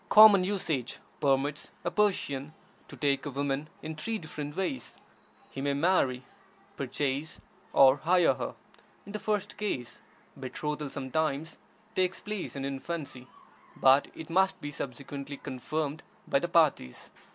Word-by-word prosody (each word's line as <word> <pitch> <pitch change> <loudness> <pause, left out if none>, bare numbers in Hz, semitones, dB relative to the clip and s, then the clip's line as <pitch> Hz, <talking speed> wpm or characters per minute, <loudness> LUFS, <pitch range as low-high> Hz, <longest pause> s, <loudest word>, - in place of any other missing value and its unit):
Common 210 -3 +9
usage 170 - -1 0.2
permits 140 +1 +1
a - - -1
Persian 155 -9 0 0.3
to - - -11
take 140 0 +1
a - - -2
woman 140 +2 -2
in 160 +1 -4
three 220 +9 -2
different 150 -4 -6
ways: 195 +8 -3 0.5
he 135 - -5
may 140 0 +1
marry, 140 -6 +2 0.5
purchase, 140 +2 -2 0.3
or 135 0 +7
hire 175 +4 +4
her. - - -5 0.5
In 200 - -9
the 210 - -3
first 210 -2 -1
case, 165 - -3 0.4
betrothal 150 +2 -3
sometimes 145 +3 -2 0.4
takes 185 0 +1
place 210 -6 -5
in 135 -1 -3
infancy, 140 -2 -5 0.5
but 135 +2 +5
it 160 0 -8
must 190 +2 +3
be 145 - -5
subsequently 140 +1 -6
confirmed 145 +4 -3 0.3
by - - +3
the 175 - -2
parties. 155 - +2
145 Hz, 135 wpm, -30 LUFS, 135-175 Hz, 0.5 s, Common